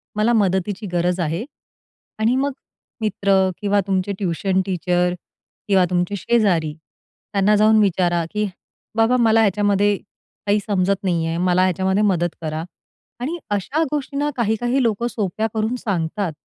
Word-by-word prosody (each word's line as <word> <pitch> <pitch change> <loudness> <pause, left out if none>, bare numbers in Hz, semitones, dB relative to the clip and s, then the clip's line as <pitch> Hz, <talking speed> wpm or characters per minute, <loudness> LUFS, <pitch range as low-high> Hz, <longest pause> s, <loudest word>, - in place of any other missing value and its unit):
मला 215 +3 +2
मदतीची 200 0 0
गरज 175 +1 +1
आहे 165 +4 -1 0.8
आणि 225 +3 +2
मग 275 +2 +1 0.5
मित्र 205 -2 0 0.3
किंवा 205 0 +2
तुमचे 190 0 0
ट्यूशन 190 0 0
टीचर 180 -1 0 0.5
किंवा 190 -3 +4
तुमचे 180 +2 0
शेजारी 180 -7 +1
त्यांना 195 +5 -2
जाऊन 215 +1 +5
विचारा 175 -3 +2
की 210 0 0 0.5
बाबा, 225 +3 +3
मला 225 -1 +4
ह्याच्यामध्ये 205 0 +2 0.5
काही 205 +1 +3
समजत 195 -1 +1
नाही 170 -4 0
आहे. 165 0 -2
मला 180 +1 +2
ह्याच्यामध्ये 190 +2 +1
मदत 175 -4 +1
करा 155 0 -3 0.6
आणि 310 +8 -2
अशा 235 - 0
गोष्टींना 290 0 -1
काही-काही 240 +3 0
लोकं 230 0 0
सोप्या 215 0 -2
करून 220 +2 -1
सांगतात 190 -4 -2
200 Hz, 135 wpm, -21 LUFS, 180-220 Hz, 0.8 s, जाऊन